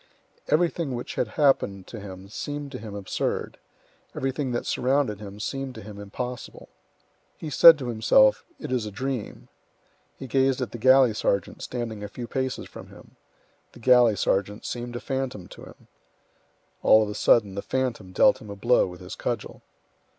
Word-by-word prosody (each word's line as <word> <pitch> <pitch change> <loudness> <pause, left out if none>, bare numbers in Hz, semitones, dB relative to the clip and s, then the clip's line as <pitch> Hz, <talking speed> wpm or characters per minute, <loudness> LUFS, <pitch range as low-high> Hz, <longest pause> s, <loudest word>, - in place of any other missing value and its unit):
Everything 160 -4 +1
which 120 - -6
had 125 - -1
happened 100 -10 +2
to 115 - -9
him 95 -1 -9
seemed 145 +6 -6
to 125 - -6
him 105 -2 -8
absurd; 100 -2 -3 0.6
everything 135 0 -2
that 120 - -2
surrounded 130 -5 0
him 100 -1 -9
seemed 135 +4 -4
to 110 - -8
him 105 0 -10
impossible. 125 +5 -7 0.7
He 155 - -6
said 165 +3 +9
to 130 -4 -5
himself, 265 - +4 0.2
"It 150 - -6
is 120 -4 -1
a - - -6
dream." 130 +1 -5 0.7
He - - -8
gazed 135 0 +2
at 125 -5 -3
the 120 - -7
galley 130 -1 +6
sergeant 100 -3 -1
standing 115 -4 -5
a - - -4
few 120 +4 -7
paces 130 +1 -3
from - - -11
him; - - -16 0.6
the - - -14
galley 120 -2 +5
sergeant 100 +2 -1
seemed 120 0 -5
a - - -3
phantom 130 -9 -4
to - - -12
him. - - -16 0.9
All 110 - +6
of 105 - -4
a - - -4
sudden 105 -2 +3
the 100 - -4
phantom 120 -8 -2
dealt - - +4
him 105 - -11
a 100 - -6
blow 120 +3 +3
with 90 0 -10
his 90 - -8
cudgel. - - -4
120 Hz, 175 wpm, -25 LUFS, 105-130 Hz, 0.9 s, said